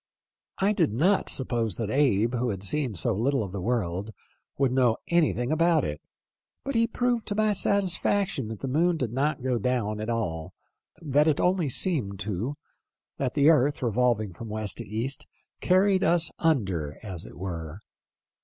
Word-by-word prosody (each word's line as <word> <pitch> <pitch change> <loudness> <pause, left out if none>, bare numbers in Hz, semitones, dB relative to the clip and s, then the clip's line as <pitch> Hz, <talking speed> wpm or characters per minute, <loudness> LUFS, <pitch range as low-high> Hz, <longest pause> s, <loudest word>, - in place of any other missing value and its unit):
" - - -58
I 200 +2 +2
did 165 - +2
not 180 - +2
suppose 120 -4 0
that 110 -2 -3
Abe, 120 -4 +2
who 125 0 0
had 95 -2 -4
seen 125 +2 -1
so 115 +7 0
little 125 +5 +1
of 95 - -6
the 100 -1 -5
world, 100 -3 -1 0.5
would 135 -2 +2
know 125 -3 +3
anything 155 -7 +2
about 165 -1 +3
it, 75 -1 -4 0.6
but 275 - -2
he 230 -1 +3
proved 245 -1 -1
to 205 - -2
my 215 0 +2
satisfaction 195 - 0
that 110 -1 -7
the 135 - -3
moon 165 +6 +2
did 120 -6 -3
not 140 +1 0
go 125 -2 0
down 110 -2 -1
at 110 +2 -4
all; 85 -9 -3 0.5
that 145 +1 +3
it 150 -2 +2
only 180 -4 +2
seemed 125 - +1
to; 105 +8 -3 0.6
that 130 -2 -1
the 145 +2 +6
earth, 145 -2 +2
revolving 115 -4 +1
from 110 +6 -8
west 105 -1 -3
to - - -6
east, 115 +7 -3 0.3
carried 190 +1 +3
us 170 -1 +3
under, 95 - 0
as 95 -6 -6
it - - -12
were. 85 -3 -5
125 Hz, 175 wpm, -27 LUFS, 105-160 Hz, 0.6 s, the